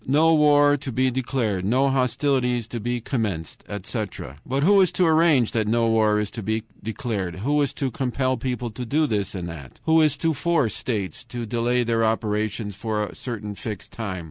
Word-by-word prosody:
"No 155 +5 +4
war 145 -1 +5
to 135 -1 -6
be 130 +2 +1
declared. 120 -6 -1
No 130 +7 +2
hostilities 125 -2 +1
to 120 - -4
be 120 +2 -2
commenced," 105 - -3
etc. 100 - -5
But 135 +2 -1
who 200 +3 +6
is 185 - +3
to 180 - +3
arrange 160 -7 +4
that 110 -2 0
no 115 +1 +2
war 110 -1 +3
is 105 -1 -2
to 115 - -6
be 110 +2 -1 0.2
declared? 110 -6 -3
Who 145 +1 +2
is 140 - +1
to 135 -2 -2
compel 130 +1 0
people 125 -1 -3
to 125 +3 -6
do 150 +6 +1
this 105 -6 -1
and 90 -2 -4
that? 75 -6 -9
Who 160 0 +4
is 150 -2 +3
to 160 +3 +1
force 145 - +1
states 105 -4 -3
to 120 -1 -5
delay 120 +2 +1
their 115 -1 +1
operations 110 -1 -1
for 105 0 -2
a - - -9
certain 105 -4 -5
fixed 105 0 -7
time? 100 -5 -4
120 Hz, 195 wpm, -24 LUFS, 105-135 Hz, 0.2 s, who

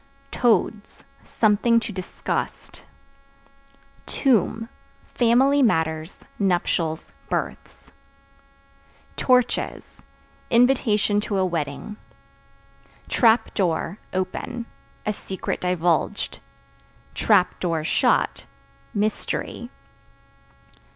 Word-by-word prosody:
Toads 225 -3 0 0.2
Something 230 +2 +3
to 225 - -5
disgust. 185 -2 -4 1.3
Tomb 225 -3 +1 0.4
Family 260 +4 +3
matters, 160 -7 +1 0.2
nuptials, 175 -4 0 0.2
births. - - -4 1.2
Torches 250 -2 0 0.5
Invitation 230 -4 +3
to 205 -1 -2
a 190 - +2
wedding. 170 +4 -4 1.1
Trap 225 -1 +3
Door 180 0 -1
(Open) 235 +6 -3 0.4
a 210 - 0
secret 190 -2 -5
divulged; 180 +2 0 1.4
(shut) - - +1 0.5
mystery. 215 +3 -2
210 Hz, 65 wpm, -24 LUFS, 180-235 Hz, 1.4 s, Something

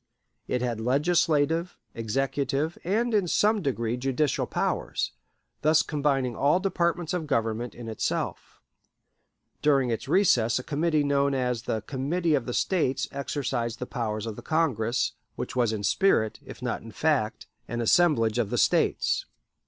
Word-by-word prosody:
It 125 0 -1
had 120 -3 -2
legislative, 160 +5 +1 0.2
executive, 135 +6 -1
and 225 +6 0
in 200 -4 +2
some 210 +4 +2
degree 120 -6 -1
judicial 135 +3 0
powers, - - -1 0.5
thus 155 +1 +4
combining 135 -5 0
all 145 +6 +3
departments 175 -2 0
of 170 -4 -2
government 115 -2 -1
in 120 -1 -8
itself. 110 - -3 1.0
During 135 -4 +3
its 115 - -3
recess 120 - +3
a 130 - -4
committee 155 +1 +1
known 140 -1 +2
as 125 -3 -1
the 110 -3 -3
Committee 150 +7 -1
of 135 -4 0
the 125 - -2
States 155 -8 +1
exercised 130 -4 -2
the 125 - -4
powers 110 -3 -3
of 110 -2 -5
the - - -9
Congress, 125 -8 0 0.2
which - - -5
was 120 -3 +2
in 105 -2 -3
spirit, 110 - +2
if 130 - -11
not 125 - -2
in 115 - -10
fact, 135 -4 0 0.2
an 120 - -3
assemblage 120 -4 +3
of 110 -4 0
the - - -1
States. - - +2
135 Hz, 150 wpm, -27 LUFS, 120-160 Hz, 1.0 s, thus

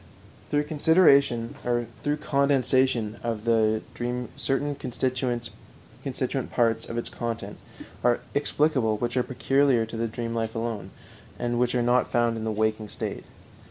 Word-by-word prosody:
Through 145 0 +2
condensation 145 -6 +4
of 125 -3 0
the 110 -1 +3
dream 125 +1 -3
certain 145 +2 -1
constituent 125 -2 -2 1.0
parts 115 -1 +1
of 115 - -4
its 120 - -3
content 115 -1 -4 0.5
are 120 0 +3
explicable 145 -6 +1
which 120 +3 -2
are 125 - +3
peculiar 135 -1 +2
to 115 +1 -7
the 115 0 0
dream 115 +1 -4
life 115 -1 -2
alone, 115 -4 -3 0.5
and 120 0 -1
which 125 0 +1
are 120 - +2
not 120 +1 +2
found 120 -1 +2
in 110 0 -4
the 110 - 0
waking 110 0 0
state. - - -5
120 Hz, 130 wpm, -26 LUFS, 115-130 Hz, 1.0 s, condensation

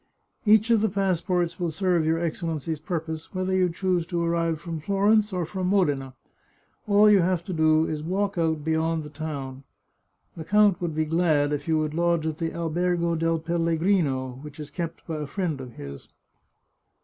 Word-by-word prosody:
Each 220 +2 +5
of 225 -2 +4
the 220 - +2
passports 185 -3 0
will 175 -1 0
serve 170 -1 +1
your 160 +1 +2
Excellency's 165 -2 -3
purpose, 160 -1 -5
whether 185 0 -1
you 185 -1 +3
choose 180 0 0
to 170 0 -1
arrive 165 -1 0
from 165 -1 -5
Florence 205 +5 +2
or 180 -2 -1
from 185 +2 -3
Modena. 145 -9 +1 0.7
All 205 +1 +6
you 210 -2 +6
have 180 -1 +1
to 185 - -4
do 160 -1 +3
is 155 -2 -3
to 150 - -7
walk 200 +2 -1
out 160 -3 0
beyond 160 0 0
the 150 - -10
town. 140 -3 -6 0.7
The 165 - -6
count 205 +1 +3
would 170 -3 -2
be 155 0 +1
glad 155 -3 +2
if 145 +1 -4
you 160 -1 +2
would 155 -1 -1
lodge 170 -1 +1
at 160 -1 -3
the 165 -1 -1
Albergo 170 +1 0
del 165 0 +1
Pellegrino, 165 -5 0
which 150 0 -11
is 150 -1 -8
kept 170 -2 -5
by 160 -2 -4
a 150 -1 -4
friend 160 -3 -2
of 125 -2 -9
his." 70 -5 -9
165 Hz, 185 wpm, -25 LUFS, 155-180 Hz, 0.7 s, All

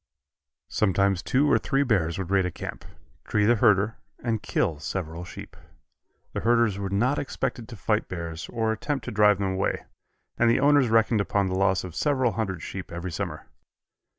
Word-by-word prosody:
Sometimes 100 -2 +2
two 130 +7 +2
or - - +5
three 135 +1 +1
bears 95 - +1
would 95 -1 -4
raid 95 -2 +3
a - - -2
camp, - - -7 0.4
tree 105 -1 +2
the 120 +2 +4
herder 105 0 +3 0.3
and 115 -3 -1
kill 75 -3 -1
several 85 +1 -4
sheep. 90 - -10 0.8
The - - -2
herders 115 -3 +2
were 100 -1 -3
not 120 +9 +1
expected 120 -3 -3
to 120 - -8
fight 105 +2 0
bears 85 -2 -6
or 110 -1 0
attempt 135 +3 -3
to 120 - -4
drive 105 -1 +4
them 95 -1 -1
away, 95 +1 -1 0.5
and 120 - +5
the 115 - +3
owners 145 -3 +4
reckoned 115 -1 +3
upon 100 0 0
the 95 - -2
loss 95 0 +2
of 90 -3 -7
several 130 - +1
hundred 95 -7 -3
sheep 95 -1 -7
every 85 +1 -5
summer. 80 - -4
105 Hz, 180 wpm, -26 LUFS, 95-115 Hz, 0.8 s, or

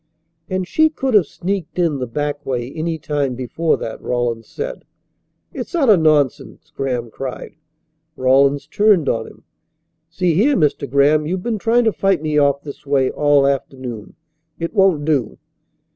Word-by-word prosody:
"And 185 -1 -2
she 315 +9 +3
could 270 -4 -3
have 200 -8 +5
sneaked 185 -2 -4
in 165 -6 +1
the 125 - -3
back 145 +4 -3
way 125 -1 -3
any 160 0 -2
time 145 -4 -2
before 130 +6 -1
that," 110 - -6
Rawlins 120 -2 -2
said. - - -6 0.7
"It's - - -6
utter 270 -11 +5
nonsense!" 155 - 0
Graham 125 -4 -3
cried. 130 +1 -6 0.6
Rawlins 135 +2 +3
turned 205 -2 +3
on 115 -1 -1
him. - - -16 0.7
"See 175 +1 0
here, 245 - +3
Mr. 150 -4 0
Graham, 145 +3 +3
you've 180 +2 -3
been 225 -3 -2
trying 235 +4 +2
to 220 -2 +2
fight 195 -5 +1
me 155 -1 +1
off 140 0 +2
this 145 - -9
way 135 -2 +2
all 145 -1 +3
afternoon. 130 -5 -3 0.4
It 165 0 -4
won't 190 -8 +3
do." 140 -8 0
150 Hz, 160 wpm, -19 LUFS, 135-185 Hz, 0.7 s, have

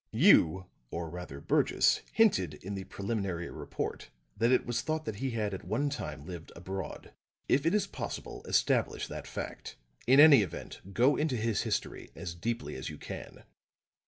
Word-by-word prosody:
You, 90 +3 +5 0.2
or 85 +2 -4
rather 90 -6 -7
Burgess, - - +3
hinted 95 - +3
in 95 +6 -7
the 95 -1 -5
preliminary 100 -4 -3
report - - -5 0.3
that 115 +2 +2
it 130 - +3
was 120 -1 -1
thought 155 0 -2
that 110 -2 -4
he 135 +4 -1
had 110 -4 -2
at 95 - -5
one 120 +10 0
time 75 - -5
lived 85 -2 -8
abroad. 95 0 -6 0.3
If 140 +4 +3
it 170 - +3
is 210 - +2
possible, - - -6
establish - - +2
that - - -6
fact. - - -6 0.3
In 130 +3 +7
any 145 -5 +9
event, 95 -6 -6
go 125 +8 +4
into 150 -5 0
his 115 -1 0
history - - -3
as 85 - -5
deeply 85 -4 -3
as 65 - -5
you - - -8
can." - - -8
100 Hz, 170 wpm, -31 LUFS, 85-130 Hz, 0.3 s, any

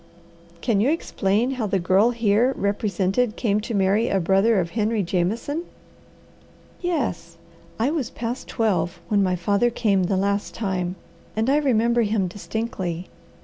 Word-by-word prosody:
"Can 210 -4 +1
you 245 - +3
explain 235 -6 0
how 250 -5 -2
the 195 - +1
girl 190 +5 +3
here 235 +2 +2
represented 200 +2 0
came 210 -3 0
to 225 +1 -4
marry 200 +4 +2
a 195 - +2
brother 195 +4 +3
of 170 -2 -2
Henry 215 -1 0
Jameson?" 195 - -1 1.2
"Yes. 270 - -2 0.4
I 240 +6 +1
was 300 -7 -2
past 240 +2 -5
twelve 180 -6 0
when 205 -2 +3
my 185 -2 +2
father 200 +6 +2
came 205 -6 +1
the 190 +1 0
last 200 +1 -1
time, 185 -4 -2 0.4
and 225 +4 +1
I 290 - +4
remember 235 -4 +2
him 210 -3 +1
distinctly. 185 -3 -4
210 Hz, 145 wpm, -23 LUFS, 190-235 Hz, 1.2 s, I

